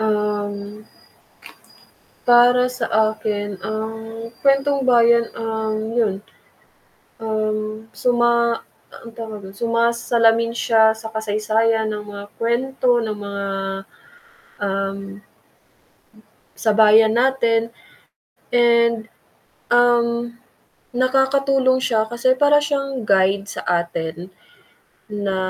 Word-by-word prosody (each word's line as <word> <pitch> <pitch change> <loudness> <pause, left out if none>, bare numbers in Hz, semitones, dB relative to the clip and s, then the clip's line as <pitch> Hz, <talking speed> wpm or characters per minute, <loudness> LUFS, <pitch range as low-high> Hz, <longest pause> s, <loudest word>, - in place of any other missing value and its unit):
Um. 210 -1 -2 1.4
Para 245 +1 +5
sa 250 -2 -4 0.3
akin 205 -2 -4
ang 225 +1 -6 0.2
kwentong 275 0 +2
bayan 235 -2 +4
ang, 220 -1 -3
yun. 225 -4 0 1.0
Ang 215 0 -3
suma 235 -1 +1 0.3
anong 230 -1 -13
tawag 220 -2 -7
dun, 190 0 -10
sumasalamin 230 0 +1
siya 220 -2 +3
sa 220 0 -9
kasaysayan 220 +1 0
ng 210 -1 -6
mga 200 -1 -8
kuwento 245 +1 0
ng 215 -2 -4
mga, 200 -1 -5 1.2
um, 195 0 -2 1.6
sa 220 - 0
bayan 220 +1 +5
natin. 235 -3 +1 0.8
And, 235 -2 +3 0.6
um, 235 0 +2 0.6
nakakatulong 265 0 +2
siya 220 -4 0
kasi 240 +2 +1
para 290 +3 +4
siyang 275 -4 -2
guide, 195 0 +2
sa - - -6 0.2
atin 170 +2 -6 0.8
na, 200 -2 -2
225 Hz, 90 wpm, -20 LUFS, 215-240 Hz, 1.6 s, Para